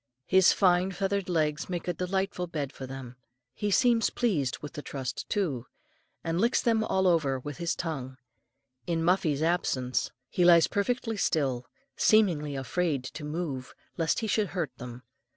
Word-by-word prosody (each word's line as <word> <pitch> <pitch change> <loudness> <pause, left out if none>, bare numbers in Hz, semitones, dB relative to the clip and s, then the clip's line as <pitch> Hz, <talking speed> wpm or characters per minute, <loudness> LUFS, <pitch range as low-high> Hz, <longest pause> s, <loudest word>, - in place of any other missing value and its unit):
His 190 -1 +6
finely 185 0 +3
feathered 195 0 -1
legs 155 -2 0
make 175 -2 -4
a 175 - +1
delightful 185 0 -2
bed 145 -5 -4
for 130 - -7
them. 130 -2 -8 0.4
He 210 - -2
seems 230 +2 +4
pleased 160 - 0
with 150 - -9
the 150 - -6
trust 135 -3 -5
too, 145 - -1 0.6
and 165 +2 0
licks 235 +2 +3
them 225 -2 +2
all 190 -3 +1
over 155 -7 +3
with 145 +2 -7
his 170 0 -1
tongue. 135 -6 -4 0.7
In 165 -1 0
Muffie's 165 -4 +2
absence, 135 -7 0 0.2
he 180 - 0
lies 170 -2 +7
perfectly 225 +1 -1
still, 135 -9 0 0.3
seemingly 165 -10 +3
afraid 140 +1 -1
to 140 +4 -7
move 150 -4 -4 0.2
lest 165 +6 0
he 220 - -1
should 210 0 +1
hurt 165 -4 -2
them. 125 0 -8
170 Hz, 160 wpm, -28 LUFS, 140-190 Hz, 0.7 s, lies